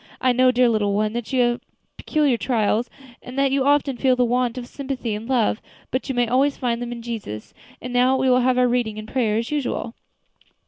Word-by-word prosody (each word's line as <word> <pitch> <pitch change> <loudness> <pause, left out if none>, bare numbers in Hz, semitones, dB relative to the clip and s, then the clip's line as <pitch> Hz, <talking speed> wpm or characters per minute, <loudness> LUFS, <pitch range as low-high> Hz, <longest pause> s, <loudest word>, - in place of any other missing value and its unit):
I 255 - +3
know, 255 +1 +4
dear 250 0 +4
little 210 -3 +1
one, 215 +1 0
that 240 +1 -5
you 260 -2 +2
have 240 0 0 0.3
peculiar 295 -5 +1
trials, 230 -1 0 0.3
and 250 +2 -10
that 275 -1 +2
you 270 0 +2
often 280 -2 +2
feel 255 0 +3
the 250 0 +2
want 245 0 0
of 250 - -5
sympathy 260 -4 -4
and 215 +4 -6
love; 235 -4 +1 0.3
but 260 +2 -2
you 265 - -1
may 245 -1 +2
always 270 +4 +2
find 240 -2 -1
them 240 0 -4
in 235 -1 -7
Jesus. 215 - -6 0.3
And 250 0 -5
now 250 +2 +3
we 265 0 +1
will 250 0 +4
have 255 0 +2
our 250 0 +4
reading 240 -3 -1
and 215 0 -7
prayer 220 -4 0
as 230 +4 -3
usual." 275 -5 -2
245 Hz, 225 wpm, -22 LUFS, 230-260 Hz, 0.3 s, know